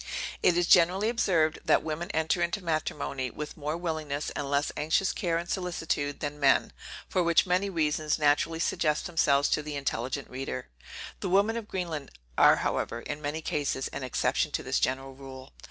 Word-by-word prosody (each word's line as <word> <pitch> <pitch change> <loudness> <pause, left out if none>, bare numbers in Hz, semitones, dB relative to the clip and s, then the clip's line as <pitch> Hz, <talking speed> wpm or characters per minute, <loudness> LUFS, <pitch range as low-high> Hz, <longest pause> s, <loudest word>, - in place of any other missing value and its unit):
It 175 - +4
is 175 - +3
generally 180 +5 +5
observed, 170 -9 +2
that - - +3
women 160 +3 -4
enter 160 +2 0
into 170 +3 -1
matrimony 145 -5 -2
with 150 +4 -7
more 150 +2 -3
willingness, 155 -4 -3
and 140 -1 -4
less 140 +1 +1
anxious 160 +6 +1
care 170 -2 0
and 170 +1 -4
solicitude, 165 -6 -2
than 145 0 -4
men, 135 -2 +3 0.3
for 185 - +1
which 170 -1 +4
many 185 +2 +1
reasons 155 -3 0
naturally 150 +2 +2
suggest 155 -2 0
themselves 145 -4 +3
to - - +1
the 150 0 -6
intelligent 135 0 -2
reader. 130 0 -5 0.5
The 190 - -3
women 200 +5 +3
of 230 -2 -5
Greenland 165 -8 -4 0.3
are - - +7
however, 115 - -2
in 145 +4 -5
many 150 +2 -3
cases, 140 -3 -1
an - - -6
exception 130 -1 0
to - - -1
this - - 0
general 135 +1 -1
rule. 130 0 -11
155 Hz, 175 wpm, -28 LUFS, 140-175 Hz, 0.5 s, are